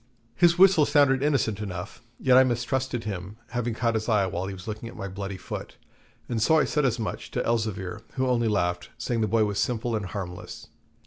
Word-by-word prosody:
His 170 +5 +4
whistle 185 -5 +6
sounded 140 -2 +4
innocent 135 -8 +1
enough, 95 -2 -6 0.2
yet 130 -1 +4
I 130 - +8
mistrusted 130 0 -1
him, 100 0 -5
having 120 -1 -2
caught 115 0 +1
his 110 +1 -2
eye 105 -3 +3
when 95 0 -3
he - - -5
was 90 +2 -11
looking 110 +1 -5
at - - -12
my 100 - -4
bloody 100 0 -5
foot; - - -7 0.5
and 115 -3 -2
so 160 +8 +4
I - - +4
said 150 -2 +1
as 120 -2 +1
much 110 -2 -4
to - - -2
Elzevir, 105 -5 -1
who 130 - 0
only 120 -2 +2
laughed, 90 -4 0
saying 120 -2 -1
the 110 - +2
boy 110 +1 +3
was 105 -1 -2
simple 120 -1 0
and 105 -3 -2
harmless. 90 -1 -7
115 Hz, 210 wpm, -26 LUFS, 100-130 Hz, 0.5 s, I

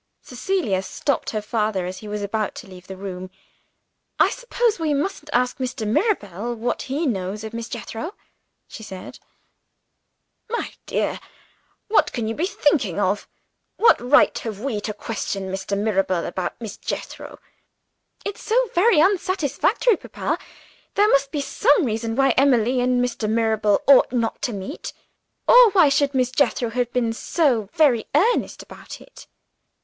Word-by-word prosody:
Cecilia 250 - -1
stopped 275 +8 -2
her 215 -1 -3
father 210 -4 -1
as 185 +1 -6
he 215 - -10
was 210 0 -4
about 210 0 -2
to 240 - -9
leave 185 -1 -13
the 190 - -8
room. 185 -1 -6 0.9
"I - - +4
suppose 485 -4 -1
we 310 -3 0
mustn't 305 +1 -3
ask 250 +1 +1
Mr. 250 -3 -3
Mirabel 230 - -1
what 235 +2 -2
he 290 +5 -1
knows 200 -4 -2
of 220 +1 -7
Miss 230 0 -5
Jethro?" 240 - -6 0.5
she - - -10
said. 190 -4 -9 1.3
"My 470 - -3
dear, - - -1 0.7
what 425 - +3
can 230 -3 -2
you 225 - -1
be 330 +9 -1
thinking 290 - +1
of? 200 +1 0 0.5
What 460 - +5
right 250 +4 +4
have 215 -4 -6
we 225 -3 -3
to 210 - -4
question 195 -4 -4
Mr. 195 +1 -3
Mirabel 195 -4 0
about 180 -2 -4
Miss 225 -3 -7
Jethro?" - - -6 0.9
"It's 405 - -5
so 480 0 +1
very 390 0 +4
unsatisfactory, 370 - +2
papa. - - -3 0.6
There 415 +1 +4
must 275 -4 +2
be 295 - -2
some 320 - +2
reason 225 0 -2
why 270 +1 +3
Emily 250 -2 +3
and 250 0 +2
Mr. 235 -3 -3
Mirabel 220 -2 +1
ought 275 -1 +6
not 235 -3 -1
to 245 - -1
meet 195 -3 -6 0.5
or - - +8
why 355 -7 +6
should 280 0 +1
Miss 255 -1 +1
Jethro 250 -3 +1
have 245 0 -1
been 235 -2 0
so 235 - 0
very 275 -8 +3
earnest 435 +11 +1
about - - -11
it?" - - -15
240 Hz, 155 wpm, -22 LUFS, 210-295 Hz, 1.3 s, or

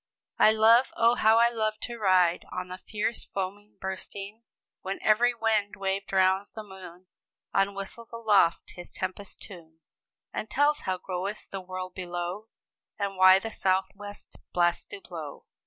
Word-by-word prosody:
] - - -65
"I - - +7
love, 225 +3 +6
oh, 230 +1 +5
how 220 -2 +4
I 235 +1 +6
love 215 -2 -1
to 235 -1 -5
ride, 185 -4 +3
On 180 0 -5
the 185 +1 -7
fierce, 215 +3 -2
foaming, 200 +2 -5
bursting 195 +2 -6 0.4
When 190 +1 -3
every 240 +3 +4
mad 215 -2 +1
wave 195 0 -2
drowns 190 +1 +2
the 220 - -7
moon, 185 -3 -12 0.5
Or 195 0 +3
whistles 200 +4 -7
aloft 215 -7 +2
his 175 -1 -9
tempest 185 +1 -5
tune, 165 -5 -12 0.5
And 215 - -4
tells 290 +5 +3
how 185 - 0
goeth 190 +3 -4
the 195 - -4
world 185 0 -6
below, 180 +3 -5 0.5
And 200 -1 -2
why 185 0 +8
the 225 +3 -4
sou'west 195 +2 -2
blasts 175 -1 +1
do 405 -1 -10
blow!" - - -8
195 Hz, 155 wpm, -28 LUFS, 185-220 Hz, 0.5 s, why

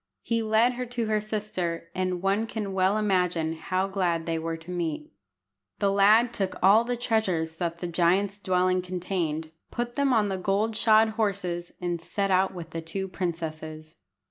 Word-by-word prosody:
He 230 -1 0
led 220 +3 +3
her 250 +1 -4
to 240 -1 -2
her 215 -1 +1
sister, 185 -6 -3
and 185 -1 -2
one 200 +3 +1
can 210 -4 -4
well 190 +2 +2
imagine 180 -6 +1
how 185 +4 -1
glad 180 -4 -1
they 165 -1 -1
were 165 0 -3
to 165 +2 -10
meet. 165 -4 -3 0.7
The 200 - +2
lad 215 +4 +5
took 195 -4 -2
all 205 +4 +7
the 245 +1 -2
treasures 185 -9 0
that 170 -1 -2
the 175 - -4
giant's 185 +4 +1
dwelling 185 -1 +2
contained, 175 -4 -3 0.2
put 240 0 -3
them 280 0 +1
on 220 -4 +3
the 190 -1 -2
gold 200 +4 0
shod 220 0 +5
horses, 195 -6 -2
and 175 -2 -2
set 195 +4 -1
out 190 +1 +3
with 170 -3 -8
the 165 - -4
two 190 +4 -4
princesses. 160 -3 -5
185 Hz, 175 wpm, -27 LUFS, 170-215 Hz, 0.7 s, all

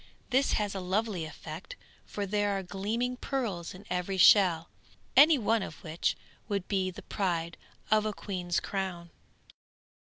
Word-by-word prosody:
This 265 +2 +3
has 205 -2 0
a 195 - -3
lovely 190 -1 -1
effect, 155 - -8 0.3
for 205 - -3
there 205 0 0
are 195 - -4
gleaming 220 +7 -2
pearls 210 -12 -3
in 195 +3 -13
every 180 +1 -2
shell, 175 -3 +6 0.5
any 295 +3 +8
one 225 -1 +2
of 155 - -7
which 160 +1 -1 0.3
would 200 -3 -1
be 190 -2 0
the 180 - -10
pride 170 -4 -2 0.4
of 215 0 +4
a - - 0
queen's 180 -4 -2
crown. 185 -4 -4
195 Hz, 150 wpm, -30 LUFS, 175-215 Hz, 0.5 s, any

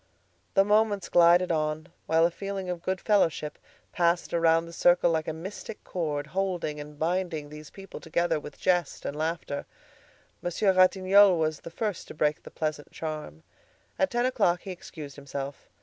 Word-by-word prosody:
The 195 0 +5
moments 210 -1 +2
glided 175 +1 +5
on, 155 +1 -1 0.2
while 160 +1 +4
a 170 - +2
feeling 195 0 -4
of 175 -1 -5
good 185 +1 -2
fellowship 165 -8 +1 0.3
passed 170 0 +1
around 165 0 +3
the 170 - -11
circle 175 0 +4
like 160 -1 -1
a - - 0
mystic 185 +6 -8
cord, 150 -5 -3
holding 175 -3 -2
and 150 0 -9
binding 165 -2 -1
these 150 0 -10
people 195 -1 -10
together 165 -1 0
with 150 -1 -10
jest 175 -5 0
and 140 - -3
laughter. 155 -2 -3 0.7
Monsieur 190 +3 +1
Ratignolle 185 +1 +5
was 155 -1 0
the - - -9
first 210 +2 -3
to - - -10
break 150 0 +1
the - - -11
pleasant 155 -2 -4
charm. 155 - -6 0.6
At 190 - +3
ten 240 +1 0
o'clock 210 -9 +2
he 195 - -7
excused 155 -5 -9
himself. 140 0 -7
170 Hz, 165 wpm, -27 LUFS, 155-185 Hz, 0.7 s, The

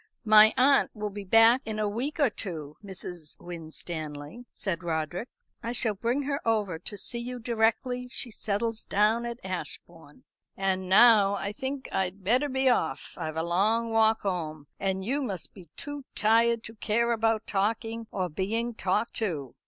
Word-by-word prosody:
"My 215 0 +8
aunt 275 +2 +5
will 210 -1 -4
be 205 0 -6
back 225 +5 +6
in 220 -1 -4
a 215 -1 0
week 245 +10 -3
or 280 -6 +4
two, 155 -8 -5
Mrs. 180 -5 -7
Winstanley," 160 +2 -7
said 170 -5 -3
Roderick. 170 +6 -3 0.3
"I 235 - -3
shall 220 -2 +1
bring 235 +7 -1
her 280 +1 -2
over 210 -7 0
to 205 +4 -3
see 235 +4 -1
you 250 +1 -5
directly 240 +2 0
she 250 -1 -5
settles 220 +2 -2
down 220 +4 +2
at 235 0 -5
Ashbourne. 170 -4 -7 0.3
And 190 -1 -1
now 205 -1 +7
I 200 0 -3
think 265 +5 -5
I'd 190 +1 -2
better 250 +9 +2
be 265 0 +1
off; 160 - +1
I've 155 0 -5
a 160 - 0
long 215 +7 +1
walk 220 0 +3
home, 160 -6 -3
and 190 -1 -1
you 275 +6 0
must 195 - -4
be 180 -5 -14
too 290 -1 -6
tired 230 +1 +3
to 225 - -9
care 230 +2 0
about 225 -1 +1
talking 225 +3 -1
or 185 -2 -2
being 220 +8 -2
talked 210 +2 0
to." 150 - -2
215 Hz, 170 wpm, -28 LUFS, 185-235 Hz, 0.3 s, My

